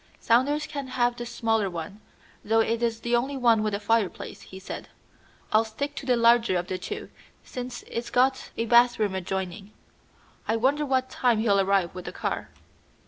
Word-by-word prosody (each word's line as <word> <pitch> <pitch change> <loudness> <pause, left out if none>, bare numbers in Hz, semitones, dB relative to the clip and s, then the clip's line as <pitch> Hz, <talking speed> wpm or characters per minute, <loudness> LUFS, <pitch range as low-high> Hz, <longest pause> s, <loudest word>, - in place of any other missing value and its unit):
"Saunders 280 +6 +2
can 285 -3 -5
have 245 -1 +1
the 240 0 -6
smaller 225 -4 0
one, 175 +4 -7 0.4
though 225 +2 +2
it 230 +1 +1
is 230 -1 -1
the 240 +1 +1
only 270 +4 -1
one 235 -4 +4
with 215 -1 0
a - - -3
fireplace," 215 -2 -1
he 190 - -11
said. 190 - -8 0.6
"I'll 215 +1 +5
stick 280 +6 -4
to 270 - -6
the 250 - +4
larger 235 -4 +4
of 175 - -2
the 185 0 -4
two, 180 - -6 0.3
since 250 -1 -7
it's 235 +1 -5
got 260 +1 +2
a 230 - 0
bathroom 235 -3 +4
adjoining. 190 +2 -4 0.7
I 225 - +2
wonder 280 +6 +1
what 260 -1 0
time 245 -3 +2
he'll 210 -2 +3
arrive 195 -3 +1
with 180 -1 -8
the - - -5
car." - - -3
230 Hz, 185 wpm, -26 LUFS, 200-245 Hz, 0.7 s, I'll